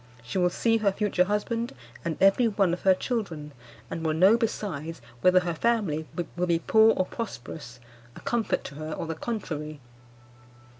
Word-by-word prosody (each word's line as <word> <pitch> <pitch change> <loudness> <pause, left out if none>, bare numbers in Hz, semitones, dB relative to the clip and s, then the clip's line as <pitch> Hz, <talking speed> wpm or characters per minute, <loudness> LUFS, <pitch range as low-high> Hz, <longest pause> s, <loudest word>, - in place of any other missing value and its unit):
She 185 +10 -3
will 180 0 +4
see 225 +5 +2
her 210 -3 +2
future 190 -2 +1
husband 230 +4 -1 0.3
and 165 -2 -2
every 195 +5 +5
one 200 -5 +2
of 180 - -3
her 190 -1 +5
children, 180 - -3 0.4
and 165 - -5
will 155 -1 +1
know 190 +7 +6
besides 180 - -3 0.2
whether 185 0 +5
her 175 -1 -2
family 165 -6 0 0.3
will 180 +1 0
be 170 -1 +3
poor 220 +6 +5
or 185 - +2
prosperous, 160 - -7 0.4
a - - -9
comfort 235 -2 0
to 140 - -8
her 155 0 -4
or - - -4
the 165 - -3
contrary. 155 -7 -4
185 Hz, 170 wpm, -27 LUFS, 160-220 Hz, 0.4 s, know